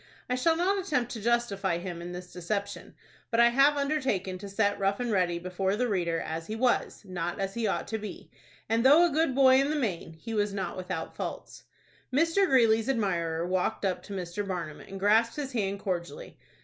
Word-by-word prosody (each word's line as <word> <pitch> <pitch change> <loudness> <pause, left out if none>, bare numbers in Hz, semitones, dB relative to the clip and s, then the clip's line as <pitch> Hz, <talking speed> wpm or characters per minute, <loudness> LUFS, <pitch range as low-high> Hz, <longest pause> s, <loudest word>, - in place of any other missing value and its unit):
I 250 - -1
shall 290 +6 +2
not 385 +3 +1
attempt 250 -8 -1
to 225 - -5
justify 205 -6 0
him 175 -1 -6
in 175 +1 -6
this 180 0 -8
deception; 200 +3 -4 0.3
but 230 - +1
I 235 0 +7
have 275 +4 +4
undertaken 260 -11 -1
to 200 +1 -8
set 205 0 +1
Rough 195 0 +1
and 245 -2 -1
Ready 180 -4 +1
before 185 +2 -1
the 250 +3 0
reader 175 -6 0
as 165 +1 -5
he 215 - -4
was, 245 -1 0
not 175 -2 -4
as 195 0 -2
he 235 -2 -1
ought 195 - -1
to 220 - -2
be, 210 0 -8 0.4
and, 225 +1 +1
though 295 +6 +7
a 345 - +1
good 305 -3 +1
boy 265 -1 +6
in 275 - 0
the 310 - 0
main, 185 - -2
he 220 +8 -8
was 205 -2 0
not 190 -3 -3
without 180 -2 -5
faults. - - -6 0.5
Mr. 330 +8 +3
Greeley's 230 -4 +4
admirer 170 -9 0
walked 185 +2 -1
up 185 -2 -1
to 205 - -9
Mr. 185 +1 -4
Barnum, 170 -5 -4
and 195 - -9
grasped 220 +4 +3
his 285 -2 -4
hand 200 -5 -1
cordially. 175 -6 -4
205 Hz, 205 wpm, -28 LUFS, 180-250 Hz, 0.5 s, I